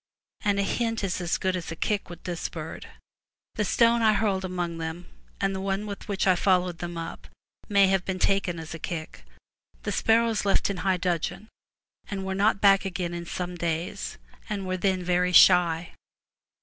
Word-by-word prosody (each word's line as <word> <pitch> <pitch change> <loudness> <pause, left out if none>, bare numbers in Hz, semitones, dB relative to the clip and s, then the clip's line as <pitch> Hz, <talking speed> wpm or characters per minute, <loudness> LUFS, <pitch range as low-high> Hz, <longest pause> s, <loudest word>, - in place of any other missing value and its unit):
And 205 -1 +2
a - - +2
hint 225 +2 -1
is 185 -2 -1
as 175 -1 0
good 185 0 0
as 175 -3 -5
a - - -4
kick 205 +3 -1
with 175 -1 -10
this 175 -2 -3
bird. 160 -1 -7 0.7
The 210 - -1
stone 235 +3 +3
I 220 -1 +5
hurled 200 -3 0
among 175 -2 -3
them, 160 +2 -5 0.3
and 195 0 0
the 190 - -4
one 195 +1 -1
with 200 -1 -7
which 200 -2 -1
I 185 -1 +5
followed 180 -2 +1
them 175 -1 -5
up, 165 0 -7 0.4
may 200 -1 +5
have 190 -1 +2
been 190 -1 -3
taken 190 -2 +1
as 160 0 -7
a 165 - -7
kick. 160 -1 -6 0.6
The - - -2
sparrows 225 -1 +2
left 200 0 +2
in 195 - -5
high 190 0 +1
dudgeon, 180 +4 -2 0.6
and 195 -2 -4
were 190 - -2
not 200 +1 +2
back 195 -1 +6
again 180 -2 -3
in 170 0 -6
some 180 0 -4
days, 170 +3 -3 0.3
and 200 -2 -3
were 185 0 -1
then 185 -1 0
very 180 +1 +1
shy. 175 -2 +6
185 Hz, 190 wpm, -26 LUFS, 175-200 Hz, 0.7 s, back